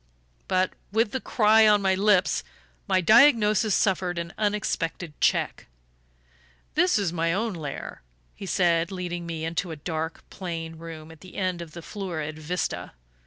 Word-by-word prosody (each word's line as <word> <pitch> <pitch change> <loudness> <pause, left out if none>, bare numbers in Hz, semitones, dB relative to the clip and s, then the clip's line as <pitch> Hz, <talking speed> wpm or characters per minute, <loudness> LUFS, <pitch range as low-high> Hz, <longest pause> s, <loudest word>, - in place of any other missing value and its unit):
But, 185 0 +1 0.2
with 220 0 +2
the 260 - -2
cry 220 -1 +5
on 210 -1 +5
my 190 -1 +2
lips, 190 -1 +3 0.4
my 185 - +3
diagnosis 215 - +5
suffered 185 -3 +1
an 170 0 -4
unexpected 190 -6 -2
check. - - +1 1.1
"This 180 - +3
is 195 -5 0
my 165 -1 0
own 215 +4 -1
lair," 150 -5 -6 0.3
he 195 - -9
said, 170 -1 +2
leading 175 -2 -4
me 160 -1 -4
into 170 +2 -2
a 160 - -5
dark 160 +1 -5
plain 165 -3 -5
room 160 -1 -9
at 160 - -15
the 185 - -13
end 185 -2 -1
of 165 -2 -9
the 170 - -9
florid 160 -7 -5
vista. 175 +3 -3
180 Hz, 155 wpm, -26 LUFS, 165-205 Hz, 1.1 s, cry